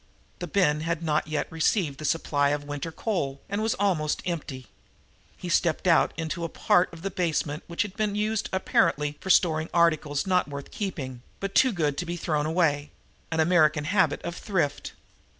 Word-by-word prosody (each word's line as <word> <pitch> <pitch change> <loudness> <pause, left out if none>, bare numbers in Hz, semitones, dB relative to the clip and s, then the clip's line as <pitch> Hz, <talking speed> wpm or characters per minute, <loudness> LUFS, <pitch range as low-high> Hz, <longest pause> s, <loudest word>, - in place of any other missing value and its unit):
The 175 - -4
bin 155 -4 +2
had 165 0 -2
not 155 -1 0
yet 155 -1 -1
received 160 -2 0
the 155 - -5
supply 145 -3 +1
of 145 0 -1
winter 145 +2 -5
coal 150 -9 -2
and 200 +1 -2
was 220 +1 +1
almost 175 -7 0
empty. 150 -7 -4 0.7
He 180 - -7
stepped 170 0 +1
out 170 - +5
of - - -26
it - - -2
into 170 +2 -4
a 165 - -2
part 180 +3 +2
of 165 0 -12
the 195 - -2
basement 160 -4 -1
which 170 - -1
had 205 -2 -8
been 210 -2 -1
used 215 +1 -1
apparently 150 -5 +1
for 190 - -6
storing 160 -3 +3
articles 155 -2 +2
not 180 -4 +2
worth 140 -1 -8
keeping, 135 - -5 0.2
but 195 0 -4
too 260 +4 +5
good 150 -7 -1
to 175 - -4
be 175 +1 -3
thrown 155 -2 -1
away 155 -3 +1 0.4
an 160 - -2
American 155 -2 +4
habit 190 +4 +1
of 170 - -4
thrift. 170 -10 -2
165 Hz, 190 wpm, -26 LUFS, 150-185 Hz, 0.7 s, out